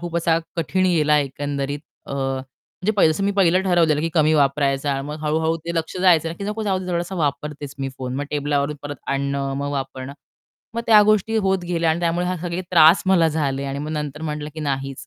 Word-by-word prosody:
खूप 175 -1 -4
असा 165 -1 +2 0.2
कठीण 185 +3 +1
गेला 155 -4 +3
एकंदरीत. 140 0 -3 0.3
अ, - - -7
म्हणजे 135 +8 -4
पाहि 190 - +5
जसं 160 +5 0
मी 200 - +2
पहिलं 185 -1 +4
ठरवलेलं 170 -5 +3
की 165 - 0
कमी 155 -1 +4
वापरायचा 140 -1 +1
आणि 135 0 -3
मग 150 +1 -5
हळू-हळू 160 +2 +1
ते 170 - -3
लक्ष 165 +1 -3
जायचं, 165 -3 +4
की 200 - -5
"नको 210 +2 -3
जाऊदे 190 -3 -1
थोडासा 175 +2 -2
वापरतेच 150 -3 -3
मी 135 0 -2
फोन." 130 -1 -4
मग 145 - -2
टेबलावरून 145 0 -1
परत 145 0 -6
आणणं, 140 0 -1
मग 140 +1 -3
वापरणं, 135 -1 -5 0.6
मग 230 - -1
त्या 215 -2 +7
गोष्टी 215 +1 +2
होत 195 -3 +2
गेल्या 170 -2 +1
आणि 160 +2 -1
त्यामुळे 175 +1 0
हे 180 0 -1
सगळे 175 +1 -3
त्रास 165 0 +6
मला 180 -4 +4
झाले 140 -3 -1
आणि 140 0 -4
मग 150 +2 -4
नंतर 150 -1 -4
म्हटलं 150 -1 -4
की 160 - -6
"नाहीच, 135 -2 -3
155 Hz, 205 wpm, -22 LUFS, 140-175 Hz, 0.6 s, त्या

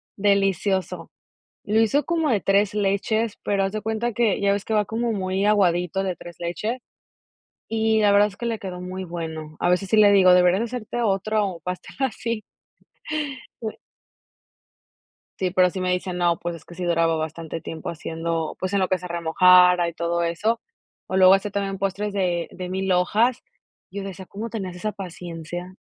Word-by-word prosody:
delicioso. 195 -1 0 0.5
Lo 215 +2 +2
hizo 260 +6 +2
como 325 -4 0
de 210 -4 +2
3 200 +1 +2
leches, 210 +2 0
pero 200 -1 +1
haz 195 - -2
de 215 - -3
cuenta 225 +2 -2
que 225 -3 +1
ya 200 0 +3
ves 200 0 -2
que 220 - -2
va 210 -1 +3
como 230 +2 -1
muy 190 0 -1
aguadito 190 -2 +2
de 185 -2 -1
3 175 0 -11
leches. 210 +8 -3 0.9
Y 220 0 +1
la 205 -1 +5
verdad 205 +1 +6
es 195 - -16
que 235 - -5
le 230 -2 -2
quedó 180 -2 -6
muy 185 +1 -5
bueno. 160 -3 -6
A 175 - +1
veces 185 +2 +1
sí 220 - +3
le 205 -1 +7
digo: 185 -2 +6
"Deberías 180 +4 +4
hacerte 240 0 -4
otro 200 -3 0
pastel 180 0 -6
así". 230 -3 -2 3.0
Sí, 185 -1 0
pero 180 0 +4
sí 185 - -5
me 180 0 0
dice 180 0 -2
no, 175 -1 +1
pues 175 0 -4
es - - -16
que 175 - -13
sí 180 +1 -5
duraba 165 -1 +2
bastante 160 +1 -4
tiempo 160 -1 -7
haciendo, 165 0 -3
pues, 185 +1 -2
en - - +3
lo 185 - +1
que 185 - +1
se 180 - -8
remojara 180 +1 +5
y - - -4
todo 170 +1 -1
eso. 205 +8 0 0.5
O 190 - -2
luego 190 0 +8
hacía 200 +1 0
también 195 -1 -2
postres 195 +1 -2
de 180 -4 -1
de 180 -1 -6
milhojas. 190 +6 +1 0.5
Yo 200 0 -5
decía: 190 -1 -8
"¿Cómo 220 +3 -6
tenías 190 -5 -5
esa 210 +4 -3
paciencia?". 175 -2 -7
190 Hz, 180 wpm, -23 LUFS, 175-210 Hz, 3.0 s, luego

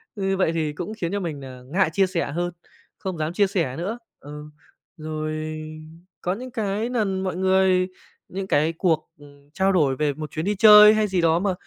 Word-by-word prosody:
Như 195 -1 -1
vậy 175 -4 +2
thì 155 -2 -1
cũng 180 +7 -6
khiến 170 -5 -3
cho 200 - -1
mình 160 -6 -4
nà 130 -2 -10
ngại 175 +4 +1
chia 195 +1 +3
sẻ 170 -6 -2
hơn, 175 +2 -2 0.5
không 185 -3 -5
dám 155 +2 -2
chia 200 +2 +3
sẻ 170 -10 -1
nữa. 195 +8 -3 0.2
Ừ, 150 +1 -9 0.5
rồi 155 0 -4 0.6
có 180 - -1
những 250 +5 -8
cái 220 -1 -2
lần 195 -6 -1
mọi 185 -2 -2
người 190 0 +2 0.4
những 190 +1 -5
cái 155 0 +2
cuộc, 165 -4 0
ừm, 145 0 -18
trao 190 +1 +2
đổi 145 -8 +2
về 150 +1 0
một 150 0 -7
chuyến 155 +3 -4
đi 210 - 0
chơi 210 +1 +9
hay 215 -1 +1
gì 185 -3 0
đó 165 0 +3
mà 195 0 0
180 Hz, 205 wpm, -23 LUFS, 155-195 Hz, 0.6 s, chơi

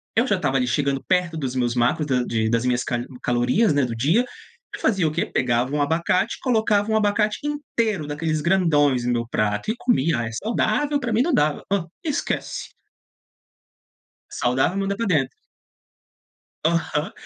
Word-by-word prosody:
eu 235 +4 +3
já 205 - +2
estava, 145 -7 0
ali, 125 -1 0
chegando 140 +1 0
perto 180 -3 +1
dos 130 -4 -3
meus 120 -2 0
macros 125 +5 +1
da 130 -3 +1
de 110 -2 -1
das 115 +1 +1
minhas 125 -1 +1
cali 120 -1 -3 0.2
calorias, 125 - +2
né, 140 -2 +2
do 120 -2 -4
dia, 155 - +2 0.5
eu - - -10
fazia 190 -7 +2
o - - -1
quê? 155 - -1
Pegava 125 +1 0
um 150 - +1
abacate, 170 +8 +1
colocava 220 -4 +1
um - - +2
abacate 210 0 +1
inteiro 230 - -2
daqueles 155 +1 -2
grandões 150 -7 +2
no 125 - +1
meu 120 -1 -2
prato 105 - -1
e - - -3
comia, 165 - +1
"ah, 115 - -2
é 115 - -6
saudável, 290 +6 +1
pra 240 -4 -2
mim 220 - +3
não 340 - 0
dava", 150 - +1
hã, 200 -4 +1 0.2
esquece. 300 -4 -3 1.6
Saudável, 130 +9 0
manda 195 0 -1
pra 230 +1 -2
dentro. 145 -8 +1 1.3
Aham. 165 +2 0
155 Hz, 175 wpm, -23 LUFS, 125-205 Hz, 1.6 s, eu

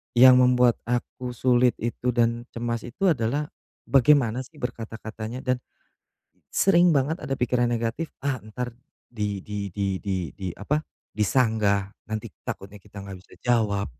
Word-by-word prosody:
yang 125 +1 +9
membuat 125 -1 +4
aku 125 0 -3
sulit 125 0 +3
itu 120 +2 -2
dan 120 0 +1
cemas 115 0 -2
itu 180 +9 +1
adalah 140 +3 -1 0.3
bagaimana, 130 -3 +4
sih, 135 +5 -9
berkata-katanya 115 -1 -6
dan 125 -1 +1 0.9
sering 175 -4 +4
banget 150 +6 0
ada 135 -3 -3
pikiran 120 0 +1
negatif, 115 +7 -1 0.2
ah, 130 -5 0
entar 120 +3 -5 0.4
di 105 -4 -3
di 100 -1 -4
di 95 0 -2
di 95 -6 -3
di 95 -1 -5
apa, 150 +9 0 0.3
disanggah, 105 -3 +2 0.2
nanti 110 -1 -3 0.2
takutnya 100 +1 -6
kita 100 0 -12
nggak 100 -1 -7
bisa - - -18
jawab 110 -5 +1
120 Hz, 140 wpm, -25 LUFS, 105-130 Hz, 0.9 s, yang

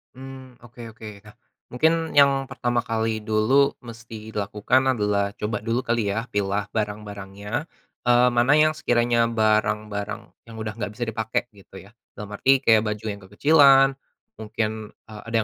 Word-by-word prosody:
Mmm, 130 -1 -11
oke 120 0 -11
oke. 105 -2 -11
Nah, 105 0 -17 0.3
mungkin 160 +7 +2 0.2
yang 140 -1 +4
pertama 120 -1 -1
kali 110 -1 -2
dulu 110 +7 +2
mesti 110 -1 -10
dilakukan 105 +5 0 0.2
adalah 100 -1 0
coba 105 0 -3
dulu 115 +3 -2
kali, 115 -3 0
ya? 110 +4 -2
Pilah 100 0 -1
barang-barangnya, 105 - -5 0.4
eee, 120 +1 +5
mana 120 +4 +3
yang 155 0 +4
sekiranya 120 -4 +1
barang-barang 105 -2 -1 0.2
yang 115 - -10
udah 110 -1 -5
enggak 110 -2 -5
bisa 120 - -2
dipakai, 110 0 -2
gitu 100 -1 -15
ya. 100 - -18 0.3
Dalam 105 -1 -8
arti 135 +5 +3
kayak 115 -5 +4
baju 105 +1 -5
yang 100 -2 -5
kekecilan, 135 +6 +5 0.5
mungkin, 110 0 -4 0.2
eee, 105 -2 -11
ada 115 - -4
110 Hz, 150 wpm, -23 LUFS, 105-120 Hz, 0.5 s, eee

